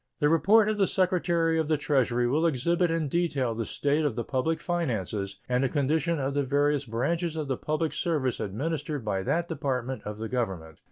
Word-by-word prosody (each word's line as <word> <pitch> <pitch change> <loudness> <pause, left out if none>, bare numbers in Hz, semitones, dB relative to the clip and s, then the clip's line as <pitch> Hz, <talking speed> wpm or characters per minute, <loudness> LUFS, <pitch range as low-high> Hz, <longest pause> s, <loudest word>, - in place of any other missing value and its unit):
The 150 -2 +3
report 200 +8 +5
of 215 -1 -1
the 195 - +4
Secretary 170 -3 +1
of 160 - 0
the 155 -1 +2
Treasury 125 -4 +1
will 155 +7 +2
exhibit 170 +5 +1
in 165 -2 0
detail 140 -6 0
the 115 0 -3
state 145 +2 0
of 145 -7 0
the 120 - -2
public 145 +7 -1
finances 110 - -2
and 125 +1 +1
the 135 - +2
condition 155 +3 +1
of 135 -1 -1
the 145 - +1
various 145 +1 +1
branches 160 +9 -1
of 155 -2 -3
the 135 - 0
public 155 +4 -2
service 150 -8 -1
administered 145 +5 -3
by 95 -2 -1
that 170 - 0
Department 130 -5 -2
of 105 0 -6
the 110 +1 -4
Government. 95 -10 -3
145 Hz, 200 wpm, -27 LUFS, 125-165 Hz, -, report